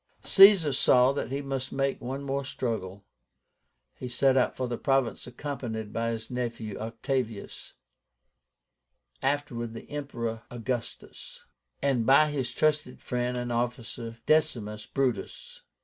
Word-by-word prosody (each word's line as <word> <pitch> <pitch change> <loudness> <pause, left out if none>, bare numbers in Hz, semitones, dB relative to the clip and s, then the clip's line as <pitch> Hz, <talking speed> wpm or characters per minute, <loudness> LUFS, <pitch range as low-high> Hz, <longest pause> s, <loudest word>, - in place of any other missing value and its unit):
Caesar 195 -7 +7
saw 125 0 +5
that 140 - -3
he 140 +2 -3
must 135 -1 -3
make 135 0 -1
one 135 +3 -4
more 140 0 -2
struggle. 110 -8 -4 0.9
He 125 - -7
set 135 +2 +3
out 130 - +2
for 130 - -2
the 120 -1 -4
province 135 -4 0
accompanied 120 -5 -5
by 115 0 -1
his 115 0 -5
nephew 115 -4 -3
OCTAVIUS 115 0 -4 1.5
(afterwards 130 -5 -1
the 115 - -9
Emperor 120 -6 -4
AUGUSTUS), 120 0 -6 0.4
and 135 -4 +2
by 150 +3 +6
his 130 -4 -2
trusted 150 -2 0
friend 125 0 -2
and 120 0 -3
officer, 120 -1 -3
DECIMUS 115 -9 +1
BRUTUS. 485 - -3
125 Hz, 125 wpm, -28 LUFS, 115-140 Hz, 1.5 s, Caesar